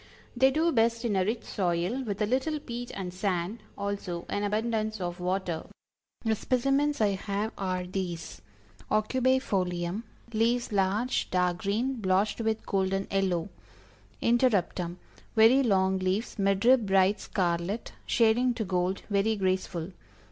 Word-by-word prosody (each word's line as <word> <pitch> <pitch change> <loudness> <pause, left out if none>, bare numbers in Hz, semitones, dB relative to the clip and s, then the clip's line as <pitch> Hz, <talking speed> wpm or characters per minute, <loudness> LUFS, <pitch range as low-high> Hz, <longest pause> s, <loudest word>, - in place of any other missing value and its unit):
They 265 +2 +5
do 320 +5 +2
best 230 -2 +2
in 215 -4 +1
a 190 - +3
rich 220 +4 -2
soil, 180 +6 -1
with 210 -2 -2
a - - +3
little 265 +7 0
peat 245 -3 -6
and 185 -2 -5
sand; 185 +2 -2 0.2
also 200 -4 -3
an 205 - -1
abundance 215 +1 -1
of 175 0 -4
water. 180 -2 -2 0.6
The 225 - +3
specimens 275 +6 +1
I 210 - +4
have 200 +2 -2
are 185 -2 -2
these: 175 - -5 0.5
Aucubæ 255 +5 +2
Folium 180 -1 -1 0.3
leaves 235 +2 +1
large, 205 +5 +1
dark 180 -1 +1
green, 230 +7 -1
blotched 195 +4 +1
with 220 0 -1
golden 195 0 0
yellow. 190 -2 0 0.7
Interruptum, 200 -7 +1 0.4
very 230 +5 +6
long 190 -5 +2
leaves, 190 +5 -1
mid 195 +1 +1
rib 250 -4 +5
bright 195 +1 +3
scarlet, 180 +3 -2 0.2
shading 240 +2 +3
to 225 - -2
gold 185 0 -1
very 205 +2 +1
graceful. 185 -3 -1
200 Hz, 140 wpm, -28 LUFS, 185-230 Hz, 0.7 s, very